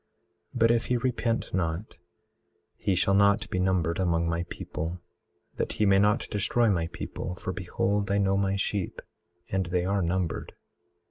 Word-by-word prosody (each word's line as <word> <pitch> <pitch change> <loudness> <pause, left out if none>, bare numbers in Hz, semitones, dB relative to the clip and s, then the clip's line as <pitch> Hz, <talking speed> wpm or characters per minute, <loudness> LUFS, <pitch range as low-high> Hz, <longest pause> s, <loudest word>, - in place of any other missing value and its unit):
18:31 - - -2
But 115 +1 +5
if 115 -1 +2
he 125 - +2
repent 115 -1 -1
not 85 +2 -2 0.8
he 95 - 0
shall 95 +2 +2
not 100 +2 +4
be 95 - 0
numbered 90 -3 +1
among 85 -2 +1
my 85 +1 -1
people, 80 +4 -5 0.6
that - - -1
he 105 - +1
may 100 -1 +5
not 105 +2 +2
destroy 110 +2 +2
my 85 -3 0
people, 90 +1 -5
for 95 0 -4
behold 100 +3 -1
I 100 - +2
know 95 -1 +2
my 100 0 +1
sheep, 100 -1 -2 0.5
and 95 -2 0
they 90 0 0
are 100 +1 +1
numbered. 90 0 -1
95 Hz, 165 wpm, -28 LUFS, 90-100 Hz, 0.8 s, But